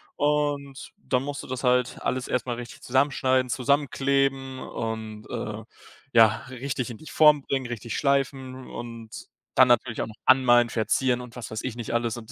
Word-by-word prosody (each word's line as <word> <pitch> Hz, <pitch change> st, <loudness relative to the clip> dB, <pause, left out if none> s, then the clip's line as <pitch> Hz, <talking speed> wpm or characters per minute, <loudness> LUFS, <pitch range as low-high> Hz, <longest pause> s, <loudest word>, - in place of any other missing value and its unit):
und 145 Hz, -2 st, -1 dB
dann 125 Hz, -1 st, -1 dB
musst 145 Hz, 0 st, -5 dB
du -, -, -10 dB
das 130 Hz, +1 st, -5 dB
halt 125 Hz, -1 st, +2 dB
alles 130 Hz, -1 st, -2 dB
erst 125 Hz, -, 0 dB
mal 120 Hz, -2 st, -2 dB
richtig 120 Hz, 0 st, -9 dB
zusammenschneiden, 130 Hz, -1 st, +2 dB
zusammenkleben 135 Hz, 0 st, 0 dB
und, 110 Hz, -2 st, -5 dB
äh, 110 Hz, -2 st, -5 dB, 0.5 s
ja, 115 Hz, -2 st, +8 dB, 0.2 s
richtig 130 Hz, 0 st, -4 dB
in 115 Hz, -, -8 dB
die 155 Hz, -, -14 dB
Form 150 Hz, -2 st, +5 dB
bringen, 135 Hz, -2 st, -2 dB
richtig 120 Hz, -1 st, -5 dB
schleifen 135 Hz, -2 st, -1 dB
und 115 Hz, -2 st, -8 dB, 0.5 s
dann 130 Hz, -, +7 dB
natürlich 120 Hz, -1 st, +2 dB
auch -, -, -2 dB
noch 110 Hz, -, -11 dB
anmalen, 120 Hz, -2 st, +5 dB
verzieren 125 Hz, +3 st, +1 dB
und 125 Hz, -2 st, -11 dB
was 120 Hz, -4 st, -7 dB
weiß 110 Hz, -, -4 dB
ich 125 Hz, -3 st, -4 dB
nicht 120 Hz, -1 st, -5 dB
alles 115 Hz, -1 st, 0 dB
und 115 Hz, 0 st, -10 dB
125 Hz, 175 wpm, -26 LUFS, 115-135 Hz, 0.5 s, ja